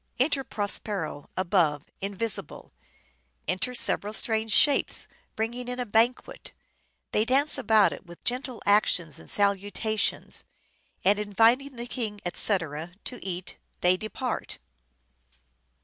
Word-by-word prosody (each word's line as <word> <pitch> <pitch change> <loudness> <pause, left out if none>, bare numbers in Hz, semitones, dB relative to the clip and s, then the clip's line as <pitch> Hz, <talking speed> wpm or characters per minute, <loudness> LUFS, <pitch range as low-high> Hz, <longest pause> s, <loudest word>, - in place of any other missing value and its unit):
" - - -32
Enter 275 -2 0
Prospero, 205 - -3
above, 170 -6 +1 0.2
invisible. 200 +2 -4 0.7
Enter 185 +9 -1
several 210 -3 +2
strange 220 -1 +1
Shapes, 285 +3 +4 0.3
bringing 240 +3 -3
in 250 0 -4
a 250 - -1
banquet; 240 - 0 0.6
they 210 - +3
dance 270 +5 +4
about 220 -5 +4
it - - -10
with 170 0 -13
gentle 250 -1 -2
actions 180 -7 +2
and - - -5
salutations; 205 +2 +1 0.6
and, 205 +2 +4
inviting 230 +7 +2
the 235 0 -5
king, 225 -4 -4
etc., 170 -3 -1
to 250 - -7
eat, 185 -1 -5 0.2
they 180 +1 +5
depart." 220 +5 -4
215 Hz, 115 wpm, -27 LUFS, 190-245 Hz, 0.7 s, they